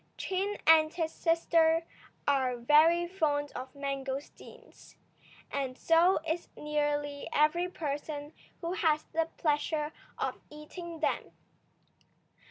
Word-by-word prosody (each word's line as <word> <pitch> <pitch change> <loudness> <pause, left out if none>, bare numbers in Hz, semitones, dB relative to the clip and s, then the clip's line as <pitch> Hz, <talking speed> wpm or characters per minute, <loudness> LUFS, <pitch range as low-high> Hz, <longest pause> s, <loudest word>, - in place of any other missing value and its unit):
Chin 390 +2 -2
and 315 -1 +6
his 325 -2 -2
sister 330 -1 +2 0.4
are 260 -3 +2
very 315 +7 +5
fond 295 -5 0
of 255 +1 -8
mangosteens, 275 0 -7 0.6
and 265 -2 -3
so 335 +3 +4
is 330 +2 -2
nearly 290 -1 -2
every 325 +4 +2
person 295 -2 -5 0.3
who 340 +1 -2
has 320 -6 +2
the 325 0 +1
pleasure 300 0 0 0.2
of - - -2
eating 320 +2 -9
them. - - -1
305 Hz, 105 wpm, -30 LUFS, 290-335 Hz, 0.6 s, and